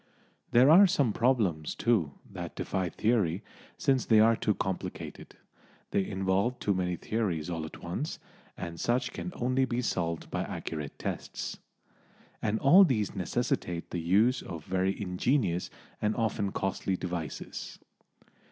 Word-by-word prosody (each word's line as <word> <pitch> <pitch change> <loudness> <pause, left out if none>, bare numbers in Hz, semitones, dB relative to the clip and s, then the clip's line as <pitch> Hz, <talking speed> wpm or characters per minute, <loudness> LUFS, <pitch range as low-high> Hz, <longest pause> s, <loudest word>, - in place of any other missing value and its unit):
There 130 +5 +6
are 195 +5 +9
some 140 - +2
problems, 105 - +1
too, 95 -12 +1
that - - -7
defy 95 -2 -2
theory, 100 -6 +1 0.3
since 135 -2 +2
they 110 -2 +5
are 115 +1 +6
too 105 -2 0
complicated; 95 -2 -5 0.6
they 100 - +2
involve 95 +5 0
too 100 - 0
many 90 -1 -1
theories 90 -5 -2
all 80 -2 -3
at - - -12
once, 90 - -3 0.4
and 85 -1 -6
such 120 +3 0
can 180 - -5
only 130 +2 +1
be 125 -2 -1
solved 85 -6 -2
by - - -1
accurate 75 -3 -5
tests. - - -5 0.8
And 110 0 +1
all 175 +9 +8
these 110 - +1
necessitate 85 -1 -2
the 85 - -2
use 105 +9 +3
of 80 -3 -7
very 95 +1 0
ingenious 95 -1 0 0.3
and 105 +1 +1
often 110 -3 0
costly 95 0 -1
devices. 85 -5 -5
100 Hz, 140 wpm, -30 LUFS, 90-120 Hz, 0.8 s, are